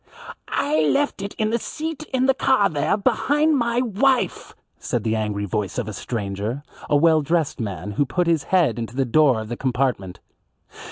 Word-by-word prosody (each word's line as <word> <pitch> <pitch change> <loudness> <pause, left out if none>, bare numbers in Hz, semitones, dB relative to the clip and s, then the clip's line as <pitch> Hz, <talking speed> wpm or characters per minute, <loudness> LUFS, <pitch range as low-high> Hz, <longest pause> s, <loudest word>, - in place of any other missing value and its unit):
"I 155 +2 0
left 275 - +1
it 200 +1 -6
in 215 0 -1
the 235 - +1
seat 310 +4 -5
in 260 0 +1
the 270 - +4
car 255 -6 +2
there 150 +5 0
behind 290 +7 +2
my 235 -2 +1
wife," 255 +3 0 0.2
said - - -2
the 110 -1 0
angry 105 -2 -2
voice 100 -1 -3
of - - -2
a 110 - -5
stranger, 105 +4 -4 0.3
a - - +3
well 160 +1 +4
dressed 160 0 -1
man 100 -3 -4
who 140 +8 +1
put 180 +5 0
his 165 -4 +1
head 165 - +2
into 115 +1 -5
the 135 0 +1
door 130 -1 +3
of 110 - -7
the 120 - -3
compartment. 125 -8 -1
150 Hz, 185 wpm, -22 LUFS, -, 0.3 s, the